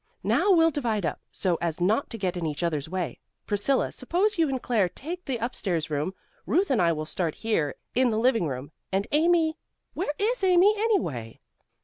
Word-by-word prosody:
"Now - - +2
we'll 330 -2 +5
divide 230 - -1
up, 155 - -2
so 180 -3 0
as 170 -1 -2
not 210 +10 +1
to 230 - -6
get 185 -3 -1
in 175 - -3
each 150 +2 -3
other's 155 -3 -1
way. 180 -7 -3 0.3
Priscilla, 210 +6 +1
suppose 375 +11 0
you 320 -3 +3
and 265 -1 -1
Claire 220 -7 +1
take 340 - -7
the 255 -4 -2
up 235 +2 -2
stairs 165 -5 -2
rooms. 150 +6 -1 0.3
Ruth 360 +1 +2
and 245 - +3
I 170 -1 +4
will 155 -1 -3
start 165 0 -2
here 185 -11 -1 0.2
in 255 0 +3
the 215 - 0
living 225 -6 +2
room, 135 +1 -5 0.2
and 195 +1 +1
Amy 320 +1 +3 0.3
where 345 -3 -1
is 440 +2 0
Amy, 370 +2 +6
anyway?" 245 - -1
220 Hz, 200 wpm, -26 LUFS, -, 0.3 s, Amy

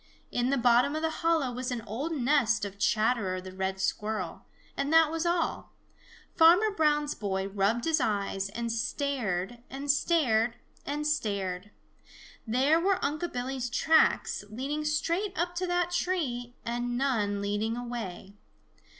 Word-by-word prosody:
In 245 +1 0
the 275 - +2
bottom 245 +4 +4
of 310 - -3
the 320 - +1
hollow 325 -6 +2
was 250 +1 -4
an 245 -3 -3
old 245 +10 -4
nest 245 -6 +2
of 200 0 -8
Chatterer 215 -4 +1
the 185 0 -9
Red 190 0 -2
Squirrel, 210 -2 -2 0.3
and 280 +2 -1
that 325 -1 +6
was 330 +1 -1
all. 340 -1 -1 0.6
Farmer 355 +6 +6
Brown's 295 -5 +1
boy 190 -2 -2
rubbed 205 +4 0
his 320 -3 +2
eyes 200 -3 -1
and 230 +2 -3
stared 235 -4 -2
and 280 +2 0
stared 245 -7 +2 0.3
and 295 +1 -2
stared. 200 -9 -1 0.8
There 270 +8 +3
were 380 +2 +2
Unc' 310 +4 -2
Billy's 250 0 -3
tracks 315 0 +3
leading 280 +7 -3
straight 340 +6 -1
up 345 +1 0
to 365 +1 -1
that 355 0 0
tree 255 -10 -2
and 240 +1 -2
none 220 -7 0
leading 205 +3 -1
away. 225 -6 -6
245 Hz, 145 wpm, -29 LUFS, 215-305 Hz, 0.8 s, that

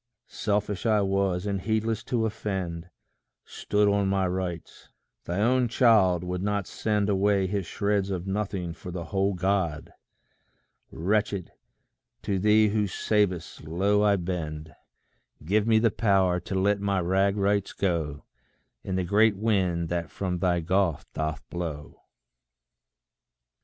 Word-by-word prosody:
Selfish 105 0 -2
I 105 -2 +3
was, 95 -1 0
and 100 -2 -2
heedless 110 +1 -1
to 115 -3 0
offend; 95 -6 -4 0.6
Stood 105 0 0
on 100 -1 +2
my 95 -1 +1
rights. 90 -2 -5 0.4
Thy 90 +3 -2
own 125 +2 +3
child 110 -8 +4
would 90 0 -3
not 100 -1 -1
send 105 0 -1
Away 100 -1 +2
his 100 -1 -2
shreds 100 -1 0
of 90 -2 -3
nothing 95 -3 -3
for 90 - -10
the 85 -1 -5
whole 95 +3 0
God! 90 -4 -1 1.0
Wretched, 100 +1 -1 0.7
to 100 -2 -1
thee 105 +2 +4
who 105 0 0
savest, 95 -5 -1
low 100 +6 +1
I 105 -1 +4
bend: 80 -4 -4 0.7
Give 105 +5 +1
me 110 -1 +5
the 110 0 +3
power 95 -5 +2
to 95 +2 -6
let 100 +1 +1
my 100 -1 +1
rag 95 +3 +1
rights 100 0 +1
go 80 -6 -2 0.6
In 95 - -3
the 95 - 0
great 105 +3 +3
wind 95 -6 0
that 85 -1 -2
from 90 -2 -3
thy 90 -1 +1
gulf 90 -1 0
doth 75 -1 -3
blow. 80 -4 -6
95 Hz, 135 wpm, -27 LUFS, 90-105 Hz, 1.0 s, me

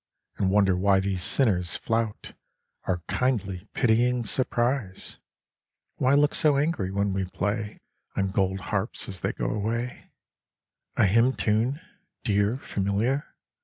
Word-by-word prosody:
And 95 - +1
wonder 95 -1 +4
why 95 +1 +3
these 95 -1 -1
sinners 95 -10 +2
flout 115 -2 -2 0.5
Our 90 -3 -1
kindly 105 -7 -1
pitying 120 0 +2
surprise, 120 -3 -1 0.8
Why 130 +2 +3
look 145 +1 +4
so 150 -3 +3
angry 140 - 0
when 100 0 0
we 95 0 -1
play 105 +3 -3 0.4
On 95 -1 0
gold 95 0 0
harps 100 +3 0
as 95 -2 -1
they - - 0
go - - -2
away, 115 +4 -3 0.9
A - - +5
hymn 115 +6 +4
tune, 115 +9 0 0.4
dear, 105 +1 +1
familiar 110 +5 -1
105 Hz, 130 wpm, -26 LUFS, 95-125 Hz, 0.9 s, A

